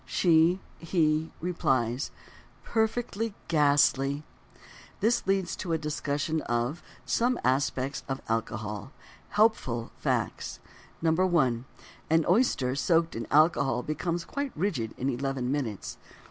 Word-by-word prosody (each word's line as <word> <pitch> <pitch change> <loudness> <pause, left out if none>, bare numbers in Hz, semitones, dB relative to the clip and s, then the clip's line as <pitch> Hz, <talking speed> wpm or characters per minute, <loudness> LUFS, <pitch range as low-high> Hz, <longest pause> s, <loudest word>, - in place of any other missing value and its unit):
She 170 +1 +3 0.2
(he) 160 -2 +1
replies: 135 -8 0 0.5
"Perfectly 225 -1 -1
ghastly." 145 -2 +3 0.8
This 225 -1 +1
leads 195 -3 +1
to 170 - -3
a - - +3
discussion 150 0 -2
of: 120 +7 0 0.2
Some 245 +2 +1
Aspects 135 +1 0
of 135 0 -2
Alcohol. 110 +2 -3 0.4
Helpful 205 - +1
Facts: - - -2 0.4
1. 160 -8 +2 0.4
An 160 0 +3
oyster 175 - +3
soaked 165 +3 +2
in 115 -1 -4
alcohol 140 -5 +3
becomes 170 +4 -2
quite 280 -1 -3
rigid 150 - -1
in 130 - -2
eleven 135 -1 -1
minutes. 125 -9 -3
150 Hz, 105 wpm, -28 LUFS, 130-175 Hz, 0.8 s, She